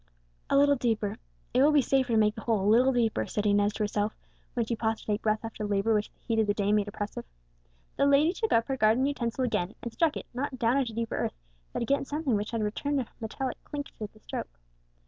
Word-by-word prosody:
"A - - +4
little 285 0 +5
deeper, 220 -3 0 0.4
it 250 - +4
will 295 +2 +6
be 295 -3 +4
safer 260 -1 +1
to - - +4
make 210 -1 +4
the 225 - -8
hole 220 -4 +1
a - - -1
little 245 +5 +5
deeper," 235 -3 +1
said 210 - -2
Inez 205 0 +3
to 215 - -2
herself, 210 +1 -1 0.4
when 235 -2 +1
she 235 - -1
paused 220 0 -1
to - - -15
take 210 0 -1
breath 215 +1 0
after 225 -1 -6
labour 205 +2 +1
which 210 0 0
the - - -38
heat 225 -2 -1
of 220 - +2
the 205 - +1
day 205 0 +1
made 210 -1 +2
oppressive. 205 0 -5 0.7
The 280 - +4
lady 290 +5 +4
took 440 +4 -2
up 230 0 +4
her 270 - -1
garden 225 +3 +4
utensil 260 -3 -1
again, 195 -4 -1
and 235 - -5
struck 325 -3 +2
it, - - -7
not 260 +1 -3
down 235 +2 +2
into 245 -5 -1
deeper 230 0 -2
earth, - - -2 0.4
but - - -2
against 275 +3 0
something 295 -3 -1
hard - - +4
which 210 +3 -4
returned 230 +6 -1
a 255 - -2
metallic 240 +4 -4
clink 285 -1 -6
to 215 - -3
the 215 - -22
stroke. - - -5
230 Hz, 245 wpm, -28 LUFS, 210-265 Hz, 0.7 s, will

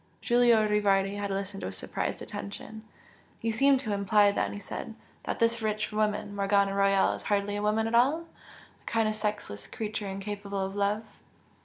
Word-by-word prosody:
Giulio 240 -3 +4
Rivardi 200 -2 +2
had 205 0 -3
listened 195 0 -4
with - - -4
surprised - - -3
attention. 210 +1 -7 0.6
"You 230 - -1
seem 275 +4 +4
to 220 -5 -3
imply 205 0 +4
then" - - -1
he - - -6
said 205 +3 -7 0.3
"that - - -2
this 230 0 +1
rich 215 0 -1
woman, 210 -1 -1
Morgana 200 0 +2
Royal, 195 0 +3
is - - -6
hardly 205 0 0
a 205 - -2
woman 215 +1 +1
at 225 - -3
all? 270 +8 +4 0.6
a - - -30
kind 225 -1 +2
of 215 - 0
sexless 210 - -4
creature 215 -2 -4
incapable 200 0 -4
of 195 +1 -6
love?" 205 +2 0
210 Hz, 175 wpm, -29 LUFS, 200-220 Hz, 0.6 s, Giulio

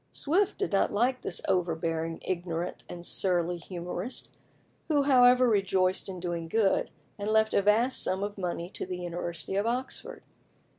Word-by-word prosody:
Swift 370 +7 +1
did 400 - -2
not 195 - +2
like 250 +5 +1
this 175 - -2
overbearing, 165 -2 -1
ignorant, 175 -1 -3
and 175 0 -7
surly 175 -2 +1
humorist, 180 +6 -6 0.5
who, 290 -3 +3
however, 250 -2 +6
rejoiced 190 -4 +1
in 185 -1 -6
doing 170 -2 -3
good, 205 +2 +2 0.3
and 205 +1 -2
left 220 0 +3
a - - +4
vast 220 +6 +3
sum 190 +1 0
of 205 0 -4
money 175 -3 -3
to 180 - -6
the 180 -1 -4
University 175 0 -4
of 200 +3 +1
Oxford. 250 +3 -4
190 Hz, 155 wpm, -29 LUFS, 175-225 Hz, 0.5 s, however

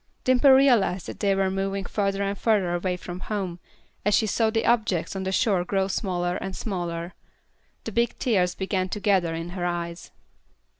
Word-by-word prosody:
Dimple 255 +2 +4
realized 250 -9 +4
that - - -8
they 200 -2 +2
were 195 -1 +1
moving 195 0 -2
further 200 0 -1
and 200 0 -1
further 200 -5 +1
away 180 +1 -1
from 180 0 -7
home, 185 -4 -4 0.4
as 205 0 +3
she 220 - +3
saw 220 +2 +1
the 225 0 0
objects 215 -8 +1
on 190 0 -3
the 190 - -1
shore 190 -2 +2
grow 190 +1 0
smaller 180 -3 -1
and 190 -1 -5
smaller. 175 -4 -4 0.7
The 225 - -5
big 235 +3 0
tears 185 -7 +1
began 190 -1 -1
to 210 - -4
gather 185 -5 +2
in 165 +1 -5
her 180 0 -5
eyes. 170 -1 -3
195 Hz, 185 wpm, -25 LUFS, 180-210 Hz, 0.7 s, Dimple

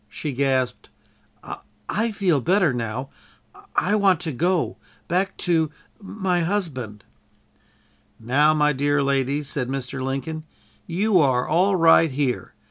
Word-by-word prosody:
She 150 - -5
gasped: 130 -1 -1 1.0
"I 225 +3 0
feel 185 -9 +1
better 175 -1 +2
now. 120 +2 -4 0.6
I 200 - +1
want 195 -5 +3
to 165 -3 -2
go 175 +6 0 0.3
back 190 +3 0
to 165 -3 +2 0.3
my 190 -3 -1
husband!" 155 - -3 1.2
"Now, 145 +7 +3
my 150 -1 +3
dear 145 +1 +1
lady," 140 +1 0
said 135 -2 -3
Mr. 135 0 -4
Lincoln. 135 +4 -4 0.4
"You 190 +3 +2
are 130 -5 +2
all 185 +5 +2
right 165 -1 +5
here. 135 -2 -2
150 Hz, 125 wpm, -23 LUFS, 135-180 Hz, 1.2 s, right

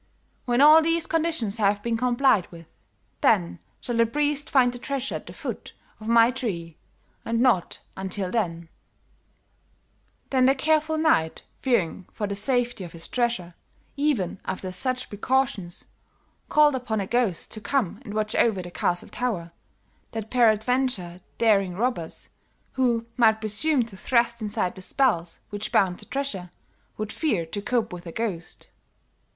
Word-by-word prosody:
When 245 0 +2
all 305 +2 +9
these 330 +1 +1
conditions 315 -11 0
have 205 -1 +1
been 235 -1 0
complied 245 -4 +2
with, 165 -1 -11 0.6
then 85 0 +2 0.2
shall 240 -2 -3
the 230 0 +4
priest 290 +3 -1
find 250 -3 +4
the 245 - -8
treasure 270 0 -3
at - - -6
the - - -8
foot - - -6 0.3
of 215 - -9
my 230 +1 +5
tree, 180 - -4 0.5
and 230 0 -1
not 235 -8 +2
until 190 0 -3
then.' 170 -7 -2 1.6
"Then 260 -1 +4
the 270 - +4
careful 315 +2 +1
knight, 165 - +2 0.2
fearing 195 -8 0
for 210 - -3
the 200 - -3
safety 240 +1 0
of 170 - -9
his 165 0 -8
treasure, 235 -8 -1 0.4
even 275 - 0
after 185 0 -4
such 255 +6 -2
precautions, 210 -5 -1 0.6
called 300 -1 +5
upon 245 -4 -2
a 195 - -1
ghost 230 -5 0
to 215 - -6
come 215 -1 -1
and 210 -3 -7
watch 215 0 -1
over 205 -6 +2
the 175 - -8
castle 175 0 -1
tower, 195 -9 -3 0.6
that 220 -1 -5
peradventure, 225 -5 +2 0.2
daring 200 -5 +3
robbers 200 -7 -3 0.4
who 240 -3 +1
might 220 -2 +5
presume 240 +6 +1
to 225 -4 -11
thrust 235 +1 +1
aside 205 -4 -1
the 190 - -10
spells 185 -6 0
which 205 0 -4
bound 185 -3 +2
the - - -12
treasure, 250 -10 -4 0.5
would 215 0 -4
fear 215 - 0
to 200 +5 -5
cope 230 -2 -1
with 175 0 -8
a - - -6
ghost." 190 -5 -5
225 Hz, 155 wpm, -25 LUFS, 190-255 Hz, 1.6 s, all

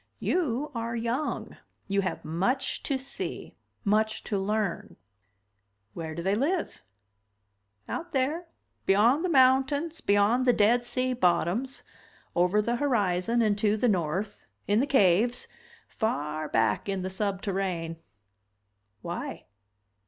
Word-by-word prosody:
"You 295 -4 -1
are 230 -1 -3
young. 235 +6 -2 0.3
You 200 0 +1
have 185 - -4
much 195 - -1
to 275 - -1
see, 270 +1 -6 0.3
much 215 +1 +1
to 200 - -1
learn." 205 -1 -2 1.0
"Where 160 -2 -5
do 170 - -4
they 190 +2 +1
live?" 310 - -1 1.1
"Out 345 +1 -5
there, 295 +6 0 0.4
beyond 230 - +4
the 365 - 0
mountains, 270 +3 +3
beyond 205 +6 +3
the 245 - +6
dead 235 +3 +3
sea 255 +1 0
bottoms, 200 +5 0 0.5
over 180 +4 +3
the 235 +2 0
horizon 230 -4 +1
and 210 -2 +2
to 210 0 +2
the 245 - +2
north, 190 +1 -1 0.2
in 205 +2 +3
the 275 - +1
caves, 235 0 +3 0.4
far 155 - -2
back 115 - +1
in 195 -2 -2
the 185 - -2
subterrane." 190 -4 -2 1.1
"Why?" - - -5
215 Hz, 125 wpm, -28 LUFS, 190-255 Hz, 1.1 s, the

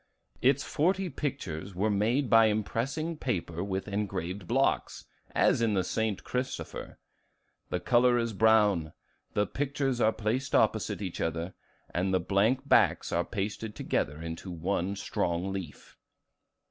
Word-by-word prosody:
"Its 135 +2 +3
forty 185 +4 +1
pictures 105 - -4
were 105 +4 +1
made 115 +7 +1
by 115 -1 +6
impressing 125 +10 -1
paper 90 - -2
with 95 0 -3
engraved 95 -2 -3
blocks, 135 +3 0 0.3
as - - +3
in 110 -3 +2
the 95 - +2
'St. 110 +1 -1
Christopher.' 125 +1 -4 0.7
The 90 - -1
color 120 +5 +4
is 115 -1 -1
brown, 105 -7 +3 0.4
the 105 - +3
pictures 135 +1 -1
are 110 - +5
placed 115 +6 -1
opposite 110 -1 +2
each 90 -3 -4
other, 80 +2 -2 0.4
and 90 +2 0
the 95 - +3
blank 110 +9 +1
backs - - +3
are 85 - +1
pasted 105 +2 -4
together 75 +1 -1
into 80 +3 -6
one 90 +3 -1
strong 90 -1 -1
leaf." 90 -6 -7
105 Hz, 135 wpm, -29 LUFS, 95-125 Hz, 0.7 s, by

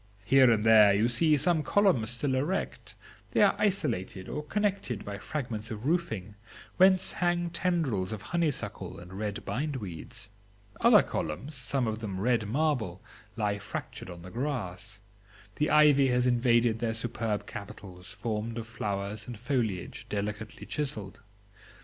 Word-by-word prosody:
Here 130 +2 +6
and 110 -2 +3
there 110 -2 +7
you 110 +3 +3
see 150 +6 +3
some 170 +1 +2
columns 150 - +2
still 125 +3 -1
erect; 150 +9 -2 0.4
they - - +5
are - - +5
isolated 125 - -1
or 150 - -3
connected 195 - -1
by 100 0 -5
fragments 115 -7 -4
of 110 +2 -6
roofing, 115 - -1 0.4
whence 185 0 +5
hang 175 -1 0
tendrils 160 - 0
of 110 -2 -5
honeysuckle 165 -5 -2
and 90 +1 -11
red 100 0 -4
bind 145 +2 -2
weeds. 100 -2 -7 0.5
Other - - +7
columns, 80 - -4
some 130 0 -1
of 110 -1 -2
them 100 -4 -4
red 115 0 +1
marble, 120 - -1 0.3
lie 105 -2 -1
fractured 100 -2 -6
on 85 -1 -9
the 90 - -10
grass. 105 -6 -4 0.6
The 150 - +1
ivy 150 -3 +6
has 125 -1 +2
invaded 120 -2 +3
their 115 -1 -1
superb 115 -2 -2
capitals, 95 -2 -9
formed 110 +2 -3
of 115 - -4
flowers 105 -3 -4
and 120 -2 -6
foliage 120 -2 -2
delicately 105 +1 -4
chiselled. 115 -10 -4
115 Hz, 145 wpm, -29 LUFS, 105-145 Hz, 0.6 s, there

